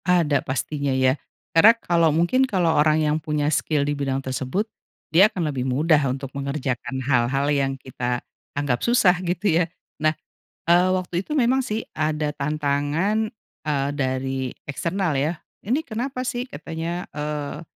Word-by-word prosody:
Ada 165 -6 +3
pastinya 140 +2 -2
ya. 130 0 +4 0.4
Karena 220 +8 +7
kalau 170 -6 +2
mungkin 170 - +2
kalau 175 -6 +2
orang 155 +1 +4
yang 150 0 +2
punya 150 -1 -1
skill 145 -2 +1
di 145 - 0
bidang 140 -2 -1
tersebut, 130 +10 -2 0.5
dia 190 +6 +7
akan 175 -8 -2
lebih 130 -1 -2
mudah 150 +4 +3
untuk 135 +1 -4
mengerjakan 140 -2 -3
hal-hal 130 +1 +2
yang 135 -1 +1
kita 125 -2 -3 0.3
anggap 140 -4 0
susah 235 -7 +4
gitu 175 -1 +1
ya. - - +4 0.4
Nah, 155 0 +3 0.6
eee, 175 +2 +6
waktu 185 -1 -3
itu - - -6
memang 260 -1 +3
sih, 220 -1 -2
ada 155 -1 0
tantangan, 150 - 0 0.3
eee, 140 -2 +1
dari 130 -1 -1 0.2
eksternal 170 +2 -1
ya, 150 +4 +1 0.3
"Ini 255 +8 +2
kenapa 255 +1 -4
sih?" 245 -1 -2
katanya, 170 -6 -5
eee, 150 +1 -4
150 Hz, 150 wpm, -23 LUFS, 140-180 Hz, 0.6 s, Karena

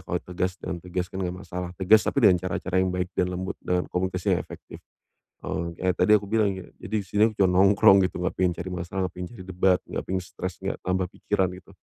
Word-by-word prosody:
kalau 90 - -1
tegas 90 +1 -2
dengan 90 - -5
tegas 90 +1 -3
kan 95 - -5
enggak 90 0 -2
masalah. 90 0 -5
Tegas 100 +4 +5
tapi 140 -5 +1
dengan 90 -3 +6
cara-cara 95 0 -1
yang 95 - +1
baik 90 0 -2
dan 90 - 0
lembut, 95 +1 -4
dengan 90 0 0
komunikasi 90 0 0
yang - - -2
efektif. - - -10 0.6
Eee, 90 -2 -3 0.2
kayak 95 0 +2
tadi - - +3
yang 105 - +5
aku 100 - -8
bilang 110 -2 +3
gini, 95 - -9
"Jadi 110 - -7
di - - -17
sini 105 +3 +1
aku 110 - -13
cuma 95 - +4
nongkrong 100 0 +6
gitu, - - -9
enggak 90 - -1
pengen 90 -1 +3
cari 90 +2 -6
masalah, 90 +1 -4
enggak 90 - -11
pengen 90 -1 -4
cari 95 - -9
debat, 90 0 +2
enggak - - -3
pengen 95 -1 -1
stres, 90 -1 -6
enggak 95 - -3
tambah 95 0 +1
pikiran." 95 -3 0
Gitu. 90 - -16
95 Hz, 245 wpm, -26 LUFS, 90-95 Hz, 0.6 s, dengan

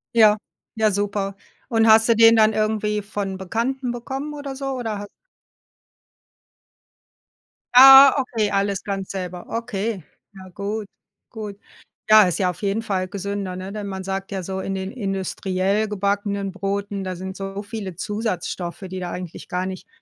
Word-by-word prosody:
Ja, 215 -2 +6 0.4
ja, 220 -1 +2
super. 200 0 -2 0.3
Und 225 -1 +3
hast 220 +1 +6
du 230 - +5
den 225 0 +7
dann 215 0 +5
irgendwie 215 -1 0
von 200 -2 -4
Bekannten 240 +7 -2
bekommen 270 +5 -5
oder 285 -2 -6
so, 275 0 -5
oder 225 -5 -3
ha 205 - -7 2.7
Ah 270 +1 +10
okay, 225 -5 0
alles 200 0 0
ganz 195 -2 -4
selber, 180 -2 -5
okay. 215 -4 -3 0.3
Ja 190 -1 -12
gut, 200 +3 -4 0.4
gut. 210 -3 -7 0.5
Ja, 215 -1 +9
ist 180 0 0
ja 185 -2 +2
auf 180 - -7
jeden 200 +2 0
Fall 190 -4 -2
gesünder, 200 -1 -4
ne? 190 +2 -7
Denn 210 -1 -5
man 190 -1 -5
sagt 195 +1 -4
ja 190 -1 -3
so, 190 +1 -4
in 195 - -3
den 190 +1 -4
industriell 195 -1 -1
gebackenen 200 -1 -1
Broten, 200 0 -3
da 185 -1 -4
sind 190 +2 -7
so 195 +1 -5
viele 200 -4 -6
Zusatzstoffe, 195 -3 -4
die 185 0 -5
da 175 -1 -4
eigentlich 180 -2 -7
gar 180 +1 -1
nicht 185 -1 -7
200 Hz, 160 wpm, -22 LUFS, 190-220 Hz, 2.7 s, Ah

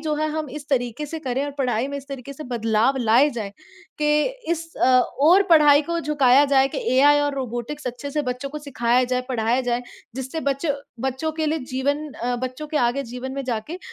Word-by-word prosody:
जो 310 -1 -1
है 310 +1 0
हम 310 -1 -3
इस 290 +1 -8
तरीके 245 +2 -1
से 320 +2 -5
करें 265 -1 -2
और 290 - -4
पढ़ाई 250 -1 0
में 280 - -4
इस 275 - -12
तरीके 275 -1 -7
से 300 +2 -9
बदलाव 230 +1 +1
लाए 240 +4 +4
जाएँ 220 -6 -5 0.5
के 300 0 +3 0.3
इस 330 -1 -3
अ, 255 0 +4 0.2
ओर 365 +5 +7
पढ़ाई 300 -2 +7
को 340 +3 -2
झुकाया 285 -3 +4
जाए 270 0 +5
कि - - -4 0.2
एआई 290 +2 +6
और 290 -1 0
रोबोटिक्स 255 +3 -5
अच्छे 250 +4 -6
से 300 - 0
बच्चों 250 +3 -5
को 300 - -5
सिखाया 250 -4 +1
जाए, 250 0 -1
पढ़ाया 240 0 +1
जाए, 245 -1 -1 0.3
जिससे 265 +4 -4
बच्चों 280 +1 0 0.4
बच्चों 290 +5 -3
के 315 0 -2
लिए 315 +1 0
जीवन 285 +4 -1
अ, 245 0 -2
बच्चों 255 +4 -5
के 305 - -3
आगे 245 +2 +1
जीवन 255 +1 -5
में 275 0 -4
जाके 250 +8 -4
270 Hz, 210 wpm, -23 LUFS, 250-300 Hz, 0.5 s, ओर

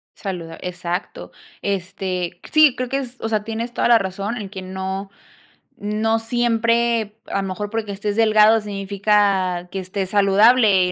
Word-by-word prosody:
Saluda 170 -5 -6
exacto. 180 - -5 0.3
Este, 185 -2 -3
sí, 305 -4 +6
creo 255 -1 -3
que 270 - 0
es 255 -2 -5
o 225 - -2
sea, 215 -2 0
tienes 225 +2 -4
toda - - +1
la 235 -1 +6
razón 195 +4 -3
en 205 -4 -6
que 190 -1 -7
no 190 +1 -5 0.7
no 215 +2 0
siempre 230 -1 0
a 200 - -1
lo - - -3
mejor 205 +2 -4
porque 220 -1 -3
estés 205 +1 -3
delgado 220 0 +5
significa 195 -3 0
que - - -5
estés 185 +1 -4
saludable, 200 -1 +4
205 Hz, 155 wpm, -21 LUFS, 190-225 Hz, 0.7 s, sí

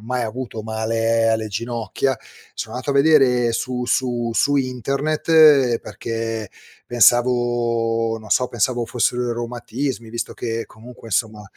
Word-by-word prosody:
mai 125 +2 -2
avuto 115 -1 -5
male 115 +1 0
alle 110 -1 0
ginocchia, 115 +4 -2 0.4
so' - - -6
nato 130 +3 -3
a - - +1
vedere 135 -5 +4
su 125 +1 -3
su 120 -2 0
su 145 +3 +2
internet 140 +1 +3
perché 115 -2 -5 0.4
pensavo 120 -2 +2
non 110 -1 -13
so 125 - +3
pensavo, 120 +1 0
fossero 120 +1 0
i - - 0
reumatismi, 120 +1 -4
visto 115 +1 -4
che 115 -1 -4
comunque 115 +1 -13
insomma, 110 -1 -1
120 Hz, 130 wpm, -21 LUFS, 115-125 Hz, 0.4 s, vedere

